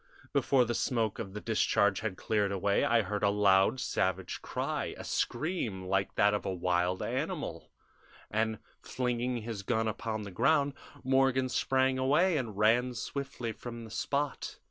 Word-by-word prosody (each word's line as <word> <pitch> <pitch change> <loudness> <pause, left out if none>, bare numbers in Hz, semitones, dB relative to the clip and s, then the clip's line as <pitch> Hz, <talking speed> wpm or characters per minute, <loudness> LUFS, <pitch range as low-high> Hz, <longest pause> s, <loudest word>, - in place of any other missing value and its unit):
Before 130 -3 +3
the 120 - -1
smoke 115 -3 0
of 100 -4 -5
the - - -3
discharge 105 -3 +2
had 105 -4 -3
cleared 105 -2 0
away 100 +1 +1
I 115 -1 +3
heard 105 +1 -3
a 100 - +4
loud 100 +3 +4
savage 95 -5 -1
cry - - -3
a - - -7
scream 130 - -2
like 95 +1 0
that 105 0 +4
of 105 - -1
a 95 - -2
wild 90 0 0
animal - - -3 0.6
and, 110 +1 0 0.2
flinging 125 -1 -2
his 110 -3 -5
gun 110 +2 0
upon 110 0 -3
the 100 - -7
ground, 140 - +2 0.3
Morgan 130 0 +3
sprang 130 +1 +1
away 155 +7 +3
and 115 -8 -3
ran 120 +4 +3
swiftly 135 -1 -4
from 115 +1 -8
the 110 - -10
spot. 140 +4 -2
110 Hz, 160 wpm, -31 LUFS, 100-130 Hz, 0.6 s, a